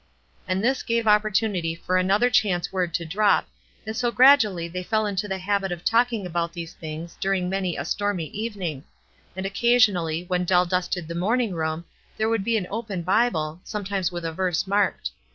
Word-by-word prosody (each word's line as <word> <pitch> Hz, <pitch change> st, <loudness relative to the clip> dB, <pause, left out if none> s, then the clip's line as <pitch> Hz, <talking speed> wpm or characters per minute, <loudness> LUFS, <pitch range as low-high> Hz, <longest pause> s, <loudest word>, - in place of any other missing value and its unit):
And 185 Hz, +1 st, -1 dB
this 260 Hz, +2 st, +1 dB
gave 230 Hz, 0 st, 0 dB
opportunity 210 Hz, -5 st, +2 dB
for 180 Hz, +2 st, -2 dB
another 200 Hz, +7 st, +3 dB
chance 190 Hz, -6 st, +1 dB
word 180 Hz, -2 st, 0 dB
to 170 Hz, -, -2 dB
drop, 200 Hz, +6 st, +2 dB, 0.4 s
and 220 Hz, 0 st, -4 dB
so 240 Hz, +1 st, +1 dB
gradually 230 Hz, -10 st, +5 dB
they 180 Hz, +2 st, -5 dB
fell 215 Hz, +3 st, 0 dB
into 205 Hz, 0 st, -2 dB
the 190 Hz, -1 st, -2 dB
habit 195 Hz, 0 st, -1 dB
of 175 Hz, -1 st, -6 dB
talking 230 Hz, -2 st, +2 dB
about 170 Hz, -1 st, -2 dB
these 170 Hz, -1 st, -7 dB
things 160 Hz, +1 st, -7 dB
dur 195 Hz, 0 st, +1 dB
ing 180 Hz, -1 st, -1 dB
many 190 Hz, -3 st, -1 dB
a 140 Hz, -, -3 dB
stormy 205 Hz, -2 st, -1 dB
evening; 200 Hz, -, -4 dB, 0.5 s
and 190 Hz, 0 st, -4 dB
occasionally, 195 Hz, -7 st, +2 dB
when 180 Hz, 0 st, -1 dB
Dell 180 Hz, 0 st, +3 dB
dusted 180 Hz, -1 st, -2 dB
the 170 Hz, -, -5 dB
morning 215 Hz, +5 st, 0 dB
room, 160 Hz, 0 st, -2 dB, 0.3 s
there 220 Hz, 0 st, +1 dB
would 225 Hz, -3 st, 0 dB
be 230 Hz, +2 st, +1 dB
an 195 Hz, -, -2 dB
open 210 Hz, -5 st, -4 dB
Bible, 180 Hz, -5 st, +1 dB
sometimes 195 Hz, -3 st, -2 dB
with 175 Hz, -1 st, -5 dB
a 165 Hz, -, -3 dB
verse 180 Hz, 0 st, 0 dB
marked. 195 Hz, -, 0 dB
190 Hz, 190 wpm, -24 LUFS, 175-215 Hz, 0.5 s, gradually